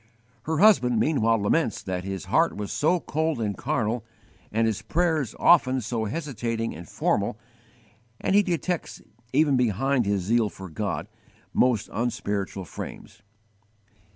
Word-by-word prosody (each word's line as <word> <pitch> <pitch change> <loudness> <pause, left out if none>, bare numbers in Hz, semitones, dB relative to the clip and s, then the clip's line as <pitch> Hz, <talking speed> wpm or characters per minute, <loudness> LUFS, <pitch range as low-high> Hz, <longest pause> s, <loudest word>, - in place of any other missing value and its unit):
Her 160 0 -1
husband 125 - +5
meanwhile 115 -7 +2
laments 110 +4 0
that 90 -1 -3
his 95 -2 -5
heart - - +2
was 105 -1 -4
so 170 +4 +2
cold 160 -2 -1
and 105 -3 -1
carnal, 110 +4 -1 0.5
and 115 +2 +2
his 110 -1 -1
prayers 155 0 0
often 130 -7 +5
so 115 -1 -2
hesitating 115 -3 -3
and 85 +1 -10
formal; 100 +1 0 0.8
and - - 0
he 205 - +7
detects, 180 -2 -3 0.3
even 145 -4 +3
behind 125 +1 +1
his 100 -2 +1
zeal 115 +2 +2
for 95 -2 -10
God, 80 - -3 0.5
most 125 -5 +2
unspiritual 105 -4 -2
frames. - - -9
115 Hz, 135 wpm, -26 LUFS, 105-150 Hz, 0.8 s, he